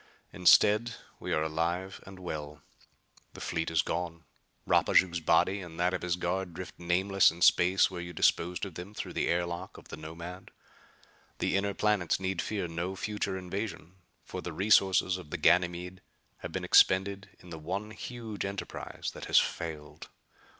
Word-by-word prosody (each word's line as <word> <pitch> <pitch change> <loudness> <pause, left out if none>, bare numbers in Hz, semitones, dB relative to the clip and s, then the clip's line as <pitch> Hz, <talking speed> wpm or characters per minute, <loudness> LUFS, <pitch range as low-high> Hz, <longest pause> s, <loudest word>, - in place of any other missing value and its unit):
Instead, 105 +5 +5 0.2
we - - -5
are 80 - +2
alive 85 +4 -2
and 95 -1 -10
well. 75 -5 -6 0.7
The - - -10
fleet 85 -1 -2
is 80 -4 +2
gone. 85 0 -4 0.4
Rapaju's 85 -2 +3
body 85 +5 +2
and 85 -2 -10
that 90 +1 +2
of 95 - -2
his 90 -1 0
guard 90 0 -2
drift 90 +1 -7
nameless 95 +3 +3
in 85 +1 -3
space 90 +2 +5
where 90 -2 -5
you 85 0 -7
disposed 85 +2 +1
of 95 - -8
them 90 +6 -9
through - - -5
the - - 0
air 85 +1 +1
lock 85 +2 -6
of - - -15
the - - -7
Nomad. 85 +4 -8 0.9
The - - 0
inner 100 0 0
planets 105 -6 +1
need 95 -2 -1
fear 100 -5 -3
no 85 +3 -4
future 100 -1 -3
invasion, 95 -1 -5 0.3
for 90 - -6
the 90 - -6
resources 95 0 +3
of 90 -5 -11
Ganymede 90 +2 +1 0.4
have - - -7
been - - -3
expended 100 +2 +4
in 90 - -15
the 80 - -7
one 95 +7 -4
huge 110 -1 -6
enterprise 100 0 -5
that - - -8
has - - +3
failed. 75 -3 -2
90 Hz, 165 wpm, -30 LUFS, 85-95 Hz, 0.9 s, Instead